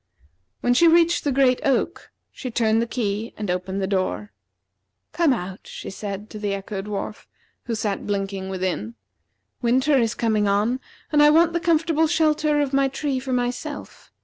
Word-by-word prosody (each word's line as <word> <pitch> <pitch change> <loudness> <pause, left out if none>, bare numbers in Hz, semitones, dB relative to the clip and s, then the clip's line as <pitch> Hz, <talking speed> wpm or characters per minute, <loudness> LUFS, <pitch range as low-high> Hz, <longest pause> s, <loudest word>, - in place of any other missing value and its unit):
When 245 - +3
she 335 +8 +5
reached 335 +1 +4
the 290 - +1
great 260 -1 +3
oak, 275 - 0 0.2
she 255 - -6
turned 225 -1 +2
the 235 - -1
key 220 -2 -3
and 210 -4 -2
opened 190 +2 -2
the - - +2
door. 195 +2 -2 0.8
"Come 335 -4 +3
out," 190 -5 -3
she - - -7
said 200 +1 -6
to 215 - -7
the 205 -1 -1
Echo 195 0 -5
dwarf, 210 +1 -5 0.4
who 235 - -2
sat 210 -2 -2
blinking 195 -1 -2
within. 180 - -3 0.7
"Winter 260 +4 +3
is 230 -1 0
coming 215 -3 +1
on, 210 +6 +1 0.3
and 295 -1 +4
I 295 - +8
want 335 +2 +4
the 340 - +1
comfortable 325 -1 +2
shelter 305 -2 +2
of 280 -1 -2
my 275 0 +3
tree 275 0 -2
for 260 0 -5
myself. 250 +4 -4
235 Hz, 175 wpm, -23 LUFS, 200-290 Hz, 0.8 s, I